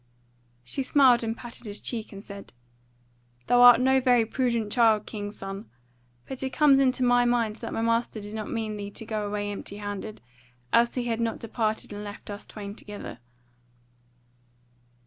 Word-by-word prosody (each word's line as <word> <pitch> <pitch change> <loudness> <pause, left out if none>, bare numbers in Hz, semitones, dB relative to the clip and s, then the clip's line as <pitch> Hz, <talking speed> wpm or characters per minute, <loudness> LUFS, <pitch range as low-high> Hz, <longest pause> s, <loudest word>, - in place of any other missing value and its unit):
She 125 - -2
smiled 260 -3 +5
and 225 +1 -2
patted 240 -1 -8
his 205 0 -3
cheek, 230 -3 -4
and 200 -1 -10
said: 200 - -10 0.9
"Thou 245 0 +4
art 245 -1 +9
no 265 +1 +4
very 245 -3 +4
prudent 235 -3 -1
child, 225 -3 +4
king's 205 -1 -6
son. 195 +2 -7 0.6
But 265 - -7
it 265 - -1
comes 280 -1 +5
into 260 -1 +2
my 245 0 +4
mind 235 -3 +1
that 230 - -6
my 225 - -2
master 230 -1 0
did 205 0 -8
not 215 -1 -5
mean 220 -2 -3
thee 200 -1 -5
to 225 - -7
go 215 -2 -3
away 205 0 -3
empty 205 0 -6
handed; 205 +1 -6 0.5
else 235 0 +4
had 250 - -1
he 235 -1 -1
not 230 -1 -1
departed 220 -2 -2
and 205 0 -6
left 205 0 -8
us 205 +1 -8
twain 200 -2 -8
together." 205 - -9
225 Hz, 175 wpm, -27 LUFS, 205-245 Hz, 0.9 s, art